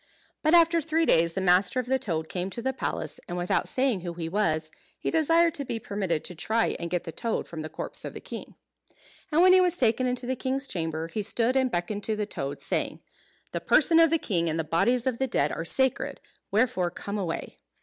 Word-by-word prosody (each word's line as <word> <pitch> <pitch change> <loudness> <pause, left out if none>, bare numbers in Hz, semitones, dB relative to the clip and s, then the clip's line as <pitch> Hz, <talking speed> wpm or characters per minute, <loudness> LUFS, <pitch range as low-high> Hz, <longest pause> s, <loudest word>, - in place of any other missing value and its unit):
But 310 +2 +4
after 335 0 +5
three 325 +2 +1
days, 165 - +4
the 190 - -2
master 180 +5 +3
of 250 - -2
the 265 +1 +1
toad 165 -10 -2
came 180 +2 -3
to 235 - -6
the 265 +1 0
palace, - - -4
and 175 - -4
without 175 0 0
saying 255 -7 +1
who 175 -1 -5
he 165 -1 -4
was, 160 -4 0 0.3
he - - -2
desired 330 +1 +3
to 290 - -4
be 235 - -3
permitted 195 -7 -2
to - - -5
try 220 +7 0
and 170 - -4
get 180 -1 -1
the 165 - -6
toad 230 +7 -2
from 160 -2 -6
the 155 - -6
corpse 160 - -5
of - - -7
the - - -5
king. - - -9 0.8
And 320 +4 +4
when 370 0 +7
he 370 - +7
was 360 -1 +2
taken 255 +1 +2
into 250 0 -2
the 260 +1 -1
king's 265 +2 -1
chamber, 160 -4 -3
he 210 +6 -3
stood 230 +4 +1
and 260 -1 +3
beckoned 205 +1 -3
to 220 - 0
the 210 0 -2
toad, 140 -8 -5
saying, - - -2 0.5
"The - - -3
person 330 -1 +4
of 330 -1 +6
the 330 - +3
king 170 - -1
and 160 - -1
the 165 - 0
bodies 230 +10 +1
of 255 -3 -1
the 265 - +1
dead 150 - +1
are 165 - -3
sacred, 265 +9 0 0.3
wherefore 205 -5 +1
come 200 +4 -5
away." 175 -4 -4
215 Hz, 230 wpm, -27 LUFS, 170-265 Hz, 0.8 s, when